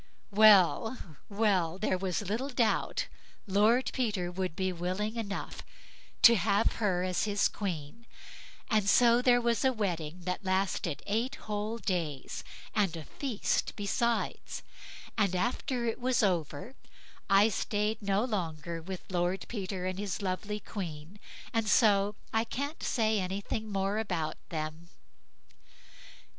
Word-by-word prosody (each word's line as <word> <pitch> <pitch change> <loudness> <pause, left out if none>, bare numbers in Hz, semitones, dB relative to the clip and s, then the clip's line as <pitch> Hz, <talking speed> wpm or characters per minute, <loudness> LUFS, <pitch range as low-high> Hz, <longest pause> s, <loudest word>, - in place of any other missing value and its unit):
Well, 215 +3 +6 0.3
well; 195 -5 +1
there 195 -1 0
was 185 +1 -2
little 225 +8 -2
doubt 245 -4 +1 0.4
Lord 215 +6 +3
Peter 205 -9 -1
would 185 -2 -3
be 185 -1 -1
willing 185 +6 -2
enough 210 -4 -4 0.6
to 235 - +10
have 200 +4 +2
her 190 -5 +1
as 185 +2 0
his 205 -1 +2
queen, 190 +3 -5 0.6
and 215 -4 +2
so 240 +2 +6
there 245 -1 +5
was 235 -2 +1
a 265 - +4
wedding 180 -7 -3
that 180 +3 -3
lasted 185 -4 -1
eight 230 +7 -1
whole 210 +2 -3
days, 165 - -3 0.3
and 195 -6 +1
a 155 - -7
feast 255 - -1
besides; 230 +3 -1 0.6
and 200 -3 +2
after 245 - -1
it 225 - -1
was 250 -2 +2
over, 175 - -1 0.6
I 200 +3 +6
stayed 210 +1 -1
no 200 +2 +1
longer 170 -6 -3
with 185 +2 -6
Lord 180 +1 0
Peter 190 -4 -4
and 185 +1 -2
his 200 -3 -3
lovely 205 +2 -3
queen, 180 -2 -7 0.3
and 225 -2 +1
so 205 -2 +4 0.2
I 225 0 +3
can't 280 +7 -4
say 220 -2 +1
anything 200 +3 -3
more 195 +2 0
about 175 -8 -2
them. 155 +1 -5
200 Hz, 130 wpm, -30 LUFS, 180-225 Hz, 0.6 s, to